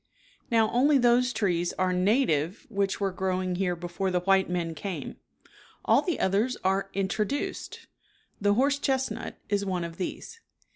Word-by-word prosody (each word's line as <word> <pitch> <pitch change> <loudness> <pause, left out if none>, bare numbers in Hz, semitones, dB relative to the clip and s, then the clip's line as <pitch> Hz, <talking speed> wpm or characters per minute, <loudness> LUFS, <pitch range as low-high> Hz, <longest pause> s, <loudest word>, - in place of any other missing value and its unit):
Now, 225 -2 +3
only 275 +4 +4
those 245 0 +3
trees 175 -7 0
are 185 -1 0
native 185 - +1
which 200 -3 -1
were 195 -1 0
growing 185 -1 -1
here 180 -2 0
before 175 +3 -3
the 180 -1 0
white 190 0 +3
men 170 -2 -2
came. 190 +2 -6 0.7
All - - +5
the 350 - -2
others 210 +7 +1
are 195 +1 +1
introduced. 205 +7 -2 0.6
The 205 0 +3
horse 280 +4 +2
chestnut 265 -2 -2
is 205 -1 0
one 185 -3 -2
of 170 0 -7
these. 325 - -6
195 Hz, 150 wpm, -27 LUFS, 180-235 Hz, 0.7 s, All